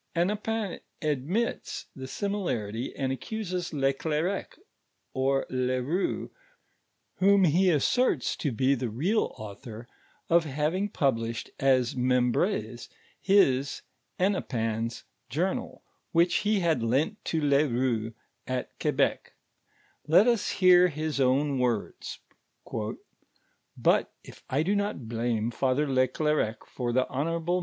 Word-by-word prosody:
Hennepin 210 +3 -1 0.2
admits 155 - -1
the 130 -1 -7
HJmilarity, 130 - -2
and 135 -1 -1
aeeuses 185 +2 -4
leClerec^ 150 +6 -1 0.6
or 135 0 +1
le 130 0 0
Koux, 160 +10 -2 0.9
whom 200 +1 +5
he 180 +3 +4
aMcrtit 170 - +2
to 145 - -1
be 130 +4 +2
the 125 -3 -2
real 170 - 0
author, 110 +2 -9 0.4
of 170 0 +4
having 155 +8 -1
published 115 - -1
at 135 -1 +4
MeinbrnV, 125 - 0 0.3
hii^ 140 -9 +3 0.4
Hennepin's 115 - -1 0.3
journal, 175 +10 -2 0.3
which 170 +1 +4
he 210 -1 +1
had 165 -7 +2
lent 145 - 0
to 160 - 0
le 145 0 +3
Koux, 120 -3 -1 0.3
at 130 -1 -3
Quebec. - - 0 0.7
Let 170 +7 +6
us 235 -3 +1
hoor 180 -1 +6
his 155 -2 -3
own 135 +1 +2
.voi'dn: 120 -4 -2 1.7
"Hut - - +3
if - - -14
I 140 +4 +1
do 195 +5 +1
not 200 - -2
blame 115 0 -1
Father 135 +4 +1
le 130 -1 +3
Clercq 150 -5 -1
for 120 -2 -3
the 130 +1 +2
honorable 165 +5 -1
n. - - 0
140 Hz, 115 wpm, -28 LUFS, 125-180 Hz, 1.7 s, Let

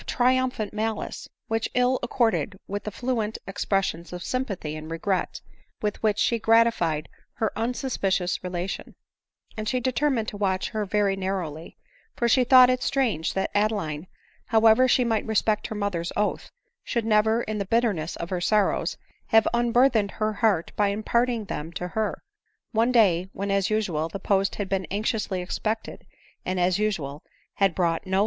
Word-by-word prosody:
301 - - -4 0.3
triumphant 215 -4 -5
malice, 220 0 -3 0.2
which 225 0 -1
ill 250 +1 +3
accorded 230 -5 0
with 205 0 -4
the - - -2
fluent 225 -1 -2
ex 195 +1 -4
pressions 190 -4 -1
of 180 -1 -6
sympathy 195 - -3
and 155 0 -8
regret 180 +3 -2 0.4
with 210 -1 -3
which 215 -2 +2
she 235 - +2
gratified 225 -9 +3 0.3
her 220 - -1
unsuspicious 220 -7 -1
relation, 180 +1 -4 0.6
and 215 -1 -3
she 255 - +1
determined 255 -2 0
to - - -5
watch 190 -2 0
her 215 -2 -2
very 200 -1 +1
narrowly; 185 -5 -4 0.4
for 235 - +1
she 255 +2 +4
thought 255 0 +8
it 255 0 +1
strange 235 - 0
that 190 - -1
Ade 210 +1 +3
line, 160 -5 -4 0.4
however 225 +2 +5
she 250 0 +4
might 225 -2 0
respect 215 0 +1
her 220 - -6
mother's 190 -5 -2
oath, 210 0 -1 0.3
should 235 -2 -2
never, 220 +1 +3
in 215 0 -3
the 200 - -2
bitterness 200 -7 0
of 170 - -6
her 180 -1 -1
sorrows, 210 +2 +1 0.3
have 225 -1 +4
unburthen 240 -1 +3
ed 200 - -9
her 215 0 0
heart 205 -6 +1
by 205 - +2
imparting 225 +3 0
them 160 -3 -5
to 180 +1 -4
her; 215 +2 -2 0.5
one 230 +3 +2
day, 190 -7 +3
when, 200 +1 -3
as 195 -1 +1
usual, 180 -8 0
the 180 - -5
post 195 0 +1
had 205 - -3
been 190 -1 -1
anxiously 205 -2 -1
expected, 215 +4 -4 0.4
and, 185 0 -2
as 180 +2 +2
usual, 160 -9 -2 0.4
had 195 -4 +2
brought 170 0 0
no. 190 +1 +1
210 Hz, 170 wpm, -25 LUFS, 185-225 Hz, 0.6 s, thought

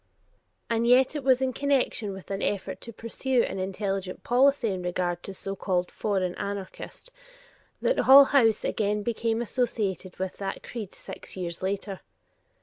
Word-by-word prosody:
And 230 0 +1
yet 255 +4 +5
it 295 - -3
was 260 0 +4
in 260 -1 0
connection 265 -6 0
with 190 0 -9
an 195 0 -2
effort 200 -2 -2
to 230 - -8
pursue 235 +3 0
an - - -3
intelligent 195 0 -3
policy 260 -1 +3
in 190 -2 -2
regard 180 0 -1
to - - -9
a - - -5
so 195 +1 -5
called 180 -2 -1
"foreign 190 -4 -1
anarchist" 200 - -6 0.7
that - - +2
Hull 275 +1 +9
House 225 -6 +4
again 210 -1 0
became 230 0 0
associated 210 -6 -2
with 190 0 -4
that 195 -1 -4
creed 220 -6 -7
six - - -9
years 170 -2 -4
later. 195 0 -3
205 Hz, 160 wpm, -27 LUFS, 190-245 Hz, 0.7 s, Hull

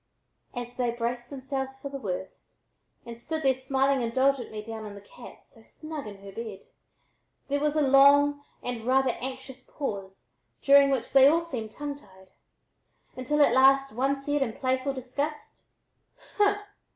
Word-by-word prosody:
As 245 0 -6
they 245 -2 +1
braced 240 +1 -3
themselves 270 -1 -5
for 280 - -6
the 275 0 -6
worst 190 -4 -6 0.5
and 235 -1 -9
stood 315 +4 -4
there 265 -1 +4
smiling 265 +1 +1
indulgently 240 -2 0
down 220 0 -7
on 210 -1 -8
the 200 - -11
cat 235 +4 -14
so 225 - -16
snug 310 +3 -8
in 200 -1 -11
her 200 - -9
bed, 215 -2 -8 0.8
there 285 +1 +1
was 300 +1 0
a 305 - +3
long 285 +1 +5 0.2
and 240 -2 -4
rather 265 0 +3
anxious 260 0 -7
pause 195 -9 -7 0.3
during 280 0 +7
which 265 -4 -2
they 270 0 +8
all 330 +3 +3
seemed 235 -10 -5
tongue 290 -1 -5
tied, 190 -5 -20 0.8
until 290 +4 +2
at - - +3
last 270 0 +5
one 270 +4 +1
said 290 +1 -2
in 235 -5 0
playful 260 +2 -1
disgust: 280 +4 -5 0.7
"Humph! 410 -1 +4
265 Hz, 160 wpm, -27 LUFS, 235-280 Hz, 0.8 s, they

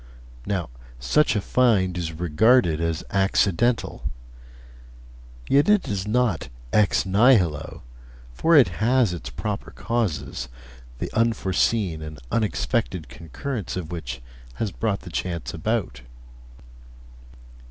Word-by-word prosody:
Now, 90 -10 -2 0.3
such 125 - +2
a 105 - +1
find 100 -6 +2
is 85 -2 -3
regarded 85 +2 +3
as 85 0 -1
accidental; 100 +4 +1 1.4
yet 140 +7 +4
it 210 -2 +4
is 100 -1 -3
not 110 - 0 0.2
"ex 105 -2 +3
nihilo," 95 - +2 0.5
for 165 - +3
it 135 -10 +7
has 120 -3 +3
its 85 - -6
proper - - -4
causes, 95 - -3 0.5
the - - -5
unforeseen 100 -5 +1
and 75 -1 -7
unexpected 105 - -1
concurrence 95 - -5
of 85 -3 -5
which 65 -8 -6 0.3
has 110 -3 -2
brought 105 -1 -2
the 90 - -10
chance 85 -1 -3
about. 60 - -2
95 Hz, 110 wpm, -24 LUFS, 80-115 Hz, 1.4 s, it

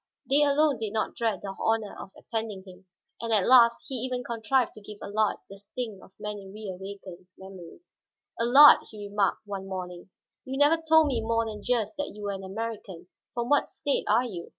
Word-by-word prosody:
They 280 +2 +4
alone 290 -2 +3
did 220 -2 -4
not 220 - -1
dread 225 -3 -1
the 195 -1 -6
honor 225 -2 0
of - - -9
attending 220 -4 -5
him. 185 0 -15 0.3
And 230 -1 -3
at 210 -4 +3
last 235 0 +6
he 275 - -5
even 250 +1 -3
contrived 235 +2 0
to 215 - -13
give 210 0 -10
Allard 215 +1 0
the 195 0 -12
sting 210 0 -6
of - - -17
many 205 -2 -6
rewakened 190 -2 -9
memories. 190 - -13 0.4
"Allard," 270 +6 +8
he 205 -2 -8
remarked 205 +1 0
one 195 -2 -6
morning, 180 -1 -7 0.3
"you 265 +1 -5
never 300 +3 +4
told 320 0 +5
me 255 -6 0
more 230 +1 0
than 215 -2 -6
just 240 +3 -1
that 290 - -4
you 210 - -9
were 205 - -2
an 195 -1 -6
American. 200 -3 -6 0.3
From 240 0 -2
what 290 - +3
state 285 - -2
are 245 - +3
you?" 180 -8 -7
220 Hz, 195 wpm, -27 LUFS, 195-245 Hz, 0.4 s, Allard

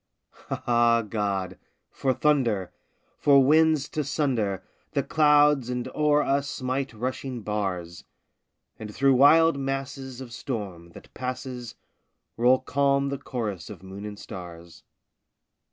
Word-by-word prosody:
Ah, 120 -1 +2
God! 100 -3 -2 0.3
for 135 - 0
thunder! 125 -10 +1 0.5
for 140 -2 +6
winds 155 0 +4
to 155 - -2
sunder 125 - -1 0.3
The - - +1
clouds 150 -4 +4
and 125 0 -3
o'er 150 -1 +3
us 140 +1 0
smite 130 0 -3
rushing 125 +1 -4
bars! 95 -5 -3 0.8
And 105 -1 -7
through 135 +5 +3
wild 145 +3 +5
masses 135 -1 -4
of 125 -3 -9
storm, 100 -10 -6
that - - -14
passes, 125 -1 -6 0.6
Roll 125 +2 +4
calm 140 +1 +1
the 140 -1 -4
chorus 110 -10 -5
of 95 -4 -10
moon 95 +2 -8
and 105 -1 -8
stars. 85 -5 -10
125 Hz, 120 wpm, -26 LUFS, 105-140 Hz, 0.8 s, for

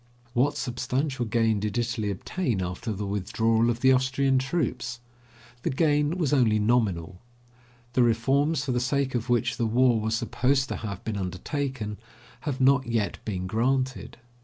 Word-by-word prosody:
What 130 +5 +2
substantial 130 +1 -2
gain 110 -1 +1
did 105 +2 -2
Italy 120 -3 -1
obtain 115 - -2
after 90 +5 -4
the 105 0 -3
withdrawal 110 +4 +1
of 120 0 -2
the 130 - +6
Austrian 130 +1 +2
troops? 130 -4 -2 0.6
The - - -1
gain 150 +3 +2
was 155 -6 0
only 115 -6 +4
nominal. 100 -6 0 0.7
The 130 - +3
reforms, 135 +6 +2
for 135 - -1
the 125 - +1
sake 135 +2 0
of 120 0 -2
which 120 -2 +1
the 115 - +1
war 120 0 +3
was 110 +1 0
supposed 130 +4 +1
to - - -3
have 100 -4 -6
been 110 -2 -3
undertaken, 105 - -3 0.5
have 130 - -3
not 135 0 +4
yet 115 -3 -1
been 95 -4 -3
granted. 130 +7 -1
120 Hz, 160 wpm, -26 LUFS, 110-135 Hz, 0.7 s, the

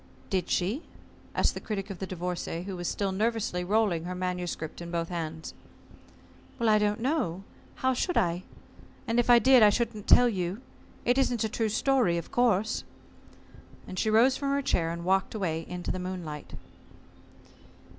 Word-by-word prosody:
"Did 185 -3 0
she?" 200 - 0 0.5
asked - - +2
the - - -5
Critic 200 -2 -4
of 190 - -8
the 190 - -4
Divorcée, 180 -1 -4
who 195 -1 -5
was 175 -1 -4
still 200 -2 -1
nervously 210 -3 -1
rolling 195 -4 +1
her 180 +1 -4
manuscript 180 -3 -4
in 170 - -6
both 170 -1 -2
hands. 160 -2 -5 1.1
"I 220 -2 +4
don't 210 +1 0
know. 240 - -1 0.3
How 260 0 +1
should 355 +8 -1
I? 175 0 +1 0.7
And 230 +1 +2
if 240 - +1
I 240 - +9
did 255 +2 +6
I 210 - +8
shouldn't 215 -1 -2
tell 245 - +7
you. 185 -2 -2 0.5
It 245 +2 +3
isn't 245 -4 +1
a 220 - 0
true 220 0 -1
story, 230 -5 +2
of 170 - -6
course." 220 -4 +2 1.0
And 185 - -5
she 220 - +1
rose 235 +5 +5
from 280 - -2
her 280 0 +1
chair 165 -9 +1
and 170 +1 -5
walked 190 +3 +1
away 165 -6 -2
into 180 0 -3
the 185 - -4
moonlight. 180 -5 -6
195 Hz, 170 wpm, -28 LUFS, 175-230 Hz, 1.1 s, I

